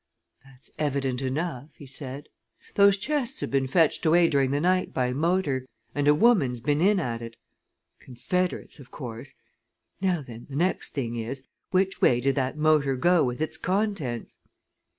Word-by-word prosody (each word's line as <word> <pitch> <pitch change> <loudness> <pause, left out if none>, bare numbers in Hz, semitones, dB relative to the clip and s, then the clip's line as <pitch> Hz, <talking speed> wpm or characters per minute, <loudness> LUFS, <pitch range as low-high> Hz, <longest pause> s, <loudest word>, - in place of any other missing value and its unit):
"That's 135 -1 -14
evident 135 -3 -1
enough," 140 +1 -3
he 145 - -12
said. 135 +1 -6 0.5
"Those 200 0 +5
chests 270 +3 -1
have - - -3
been 135 -1 +1
fetched 160 +3 +2
away 170 +1 +5
during 135 -2 +2
the 140 +1 0
night, 185 +3 +1
by 125 -1 0
motor, 150 -4 0 0.3
and 145 0 0
a 150 - +6
woman's 155 - +3
been 145 +5 0
in 200 +2 +4
at 120 -7 -3
it! 115 0 -8 0.6
Confederates, 165 +9 -3
of 130 - -13
course. 125 0 -8 0.7
Now 180 -5 +1
then, 120 -2 -11
the 135 - -7
next 175 +5 0
thing 120 -4 -2
is, 130 +4 -5 0.2
which 190 +1 0
way 120 - +4
did 135 +2 +1
that 135 +1 -2
motor 150 -3 +3
go 175 +5 +3
with 125 +3 -2
its 155 - -2
contents?" 185 - -2
145 Hz, 165 wpm, -26 LUFS, 130-175 Hz, 0.7 s, a